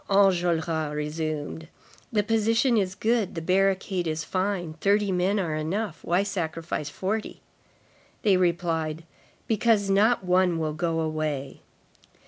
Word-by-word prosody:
Enjolras 170 -6 +2
resumed: 155 +1 -3 0.4
"The 210 -3 +2
position 225 +3 +2
is 190 -3 0
good; 220 -1 0
the - - -2
barricade 190 0 +1
is 155 0 -2
fine. 185 -2 -2
Thirty 205 0 +2
men 185 +3 +1
are 165 -5 -1
enough. 165 +4 -2
Why 175 +3 +2
sacrifice 165 -6 -3
forty?" 205 +8 -4 0.8
They 200 -3 +4
replied: 165 -3 0 0.4
"Because 215 -2 +2
not 210 +3 +3
one 180 -1 +2
will 155 -1 -1
go 165 0 -1
away." 155 -3 -3
180 Hz, 120 wpm, -26 LUFS, 160-200 Hz, 0.8 s, They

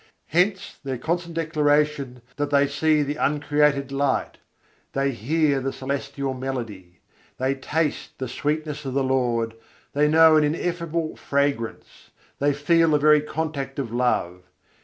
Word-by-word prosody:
Hence 190 +4 0
their 135 -2 -3
constant 170 +4 -3
declaration 150 -5 +1
that 145 0 -1
they 140 0 +4
see 150 +2 +2
the 145 +1 -3
uncreated 145 -2 +1
light, 140 -1 -1 0.5
they 135 0 +1
hear 140 +4 +1
the 135 +1 -2
celestial 140 0 -3
melody, 115 -10 -6 0.4
they 130 +1 +1
taste 150 +3 -2
the 130 - -4
sweetness 150 +3 -3
of 135 -1 -4
the 140 - +2
Lord, 120 -4 0 0.4
they 150 +1 +3
know 160 0 +6
an 155 - +4
ineffable 170 +1 -2
fragrance, 140 -5 -2 0.3
they 145 +1 +3
feel 165 +3 +3
the 150 - +4
very 150 0 +5
contact 150 -3 -4
of 125 -5 -4
love. 105 -8 0
145 Hz, 140 wpm, -24 LUFS, 135-155 Hz, 0.5 s, know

